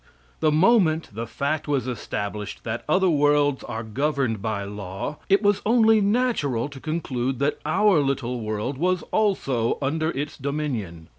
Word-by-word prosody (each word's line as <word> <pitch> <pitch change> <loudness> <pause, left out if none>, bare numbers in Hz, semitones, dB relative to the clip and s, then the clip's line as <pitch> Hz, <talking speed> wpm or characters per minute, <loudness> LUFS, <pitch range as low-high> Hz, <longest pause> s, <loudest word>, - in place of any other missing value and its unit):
The 155 - +3
moment 165 -1 +3
the 115 +2 -5
fact 145 +2 -2
was 135 -4 0
established 105 -4 -4
that 115 +1 -4
other 185 +4 +3
worlds 145 -3 +3
are 115 -1 -5
governed 130 -1 -1
by 105 -2 -2
law, 100 +7 -5
it 200 +2 +4
was 205 -1 +3
only 225 -1 +4
natural 200 - +1
to 140 -2 -10
conclude 135 -5 -2
that 140 +3 0
our 190 +2 +4
little 135 -3 -1
world 110 +5 -3
was 180 +2 +1
also 135 - +1
under 155 +3 0
its 145 -2 -4
dominion. 125 - -3
140 Hz, 150 wpm, -24 LUFS, 115-160 Hz, -, it